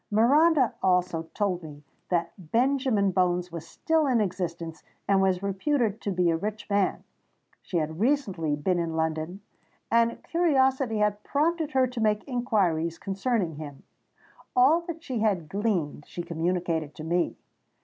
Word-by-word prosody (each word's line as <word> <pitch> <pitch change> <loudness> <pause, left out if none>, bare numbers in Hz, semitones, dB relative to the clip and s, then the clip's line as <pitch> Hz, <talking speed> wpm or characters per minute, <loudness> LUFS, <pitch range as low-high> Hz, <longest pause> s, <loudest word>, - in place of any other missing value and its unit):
Miranda 270 +5 +4
also 180 -3 +1
told 195 -4 0
me 150 -2 -11 0.3
that 170 -2 0 0.2
Benjamin 245 -5 +2
Bones 180 -1 +1
was 165 -1 -7
still 320 -2 +1
in 250 -3 +3
existence 170 -5 -3 0.3
and 195 -1 +4
was 190 -1 +1
reputed 220 +2 0
to 200 - -2
be 180 -2 +2
a - - +1
rich 210 +4 -5
man. 200 -2 +1 0.6
She 180 - -3
had 160 0 -2
recently 200 - +1
been 175 +5 0
in 165 -1 -2
London; 160 +4 -2 0.5
and 230 0 +2
curiosity 265 -8 +2
had 210 0 +1
prompted 315 +1 0
her 260 -1 +4
to 250 -2 -5
make 210 -1 +2
inquiries 190 - 0
concerning 195 - -1
him. 145 -3 -9 0.7
All 275 +7 +5
that 330 -1 -6
she 255 -8 -3
had 200 -7 +1
gleaned, 180 -7 -2
she 175 - -6
communicated 170 -2 -2
to 155 - -8
me. 170 +2 0
195 Hz, 150 wpm, -27 LUFS, 170-245 Hz, 0.7 s, All